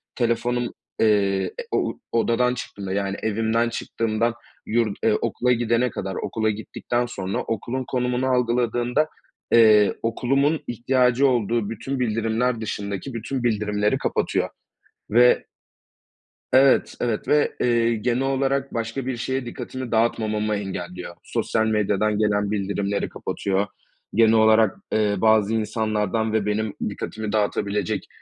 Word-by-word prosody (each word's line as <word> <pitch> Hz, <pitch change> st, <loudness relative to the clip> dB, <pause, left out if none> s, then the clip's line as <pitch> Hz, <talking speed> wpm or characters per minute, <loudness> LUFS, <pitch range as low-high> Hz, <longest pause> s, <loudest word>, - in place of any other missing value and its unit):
telefonum, 120 Hz, 0 st, 0 dB, 0.3 s
eee, 100 Hz, -3 st, +3 dB, 0.2 s
e -, -, -10 dB
o -, -, -1 dB
odadan 115 Hz, +2 st, +2 dB
çıktığımda, 100 Hz, -6 st, -6 dB
yani, 100 Hz, 0 st, -1 dB
evimden 115 Hz, +2 st, +1 dB
çıktığımdan 115 Hz, 0 st, -1 dB, 0.3 s
yurt, 110 Hz, -3 st, 0 dB
eee, 110 Hz, -, +4 dB
okula 120 Hz, +3 st, 0 dB
gidene 120 Hz, +1 st, +2 dB
kadar, 95 Hz, -3 st, -5 dB
okula 110 Hz, -1 st, -1 dB
gittikten 115 Hz, +3 st, -2 dB
sonra, 100 Hz, -6 st, -4 dB
okulun 120 Hz, +4 st, -3 dB
konumunu 125 Hz, 0 st, 0 dB
algıladığında, 125 Hz, +2 st, +1 dB, 0.5 s
eee, 110 Hz, -3 st, +6 dB
okulumun 135 Hz, +6 st, +1 dB
ihtiyacı 125 Hz, +2 st, +2 dB
olduğu 115 Hz, -3 st, 0 dB
bütün 130 Hz, +5 st, -4 dB
bildirimler 115 Hz, +1 st, 0 dB
dışındaki 100 Hz, +3 st, -4 dB
bütün 120 Hz, +3 st, -4 dB
bildirimleri 105 Hz, -2 st, +1 dB
kapatıyor -, -, -1 dB, 0.6 s
ve 120 Hz, +3 st, +5 dB, 1.1 s
Evet, 135 Hz, 0 st, +4 dB
evet 115 Hz, -3 st, -1 dB
ve, 150 Hz, 0 st, +2 dB
eee, 120 Hz, -1 st, +2 dB
genel 120 Hz, +3 st, 0 dB
olarak 135 Hz, 0 st, 0 dB
başka 115 Hz, +3 st, -3 dB
bir 130 Hz, -2 st, -2 dB
şeye 130 Hz, +2 st, -2 dB
dikkatimi 130 Hz, +1 st, -6 dB
dağıtmamamı 110 Hz, -2 st, +1 dB
engelliyor. 90 Hz, -3 st, -5 dB
Sosyal 110 Hz, 0 st, 0 dB
medyadan 105 Hz, -1 st, +1 dB
gelen 105 Hz, -1 st, +1 dB
bildirimleri 100 Hz, 0 st, -1 dB
kapatıyor. 100 Hz, +1 st, -2 dB, 0.5 s
Genel 110 Hz, 0 st, +5 dB
olarak, 110 Hz, -1 st, +4 dB
eee, 105 Hz, -1 st, +2 dB
bazı 110 Hz, +1 st, +3 dB
insanlardan 110 Hz, 0 st, -1 dB
ve 110 Hz, -2 st, +1 dB
benim 105 Hz, 0 st, -1 dB, 0.2 s
dikkatimi 110 Hz, +1 st, -5 dB
dağıtabilecek, 105 Hz, -2 st, -1 dB
115 Hz, 120 wpm, -23 LUFS, 105-120 Hz, 1.1 s, eee